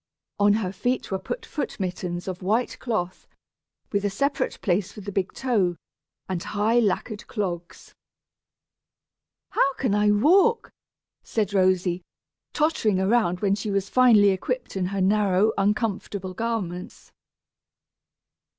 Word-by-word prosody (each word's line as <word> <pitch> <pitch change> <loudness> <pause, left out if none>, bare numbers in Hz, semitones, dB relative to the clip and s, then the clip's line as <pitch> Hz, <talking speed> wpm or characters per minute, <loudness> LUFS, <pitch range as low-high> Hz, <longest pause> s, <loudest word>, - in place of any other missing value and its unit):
On 205 0 +5
her 210 -4 -1
feet 245 +5 -2
were 190 - -1
put 480 - -5
foot 295 - -5
mittens 180 -1 -4
of 185 -1 -5
white 220 +6 0
cloth, 185 -7 -3 0.6
with 200 -1 0
a 205 - +1
separate 275 +9 -1
place 195 0 0
for - - -11
the 200 +1 -6
big 190 -1 -1
toe, 210 -9 0 0.5
and 185 -2 -3
high 215 +5 +1
lacquered 215 0 -1
clogs. 180 -6 -5 1.6
"How 275 - +2
can 250 -6 0
I 210 0 +3
walk?" 375 - +4 0.5
said 210 -3 -2
Rosy, 185 -2 +2 0.5
tottering 265 - +1
around 190 -3 +2
when 200 -2 +2
she 210 +1 -2
was 200 0 -1
finally 225 -6 +6
equipped 245 +6 -3
in 185 -2 0
her 195 0 -2
narrow 200 +1 +3
uncomfortable 200 -2 -1
garments. 190 -5 -4
205 Hz, 130 wpm, -25 LUFS, 185-225 Hz, 1.6 s, finally